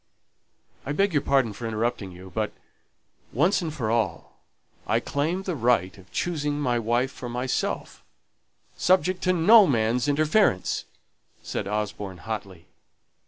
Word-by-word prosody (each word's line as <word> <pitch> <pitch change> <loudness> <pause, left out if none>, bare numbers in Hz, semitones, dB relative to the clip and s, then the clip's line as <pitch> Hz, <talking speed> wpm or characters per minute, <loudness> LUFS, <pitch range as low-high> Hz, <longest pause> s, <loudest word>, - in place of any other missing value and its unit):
"I 145 - -3
beg 195 +3 +1
your 145 - +3
pardon 135 -6 +2
for 115 +3 -6
interrupting 110 -2 -2
you, 90 +1 -12
but, 110 0 -1 0.8
once 170 - +2
for 150 -10 -2
all, 110 -8 -2 0.5
I - - +2
claim 165 +7 -2
the 185 -3 -2
right 120 -7 +1
of 95 -1 -17
choosing 150 -4 -1
my 125 -4 +1
wife 120 +4 0
for 125 - -7
myself, 125 +2 -3 0.7
subject 185 0 +2
to 185 - +4
no 200 +5 +7
man's 120 -1 +1
interference," 155 - +2 0.6
said - - -4
Osborne, 100 -2 -3
hotly. 95 -3 -6
125 Hz, 130 wpm, -25 LUFS, 105-155 Hz, 0.8 s, no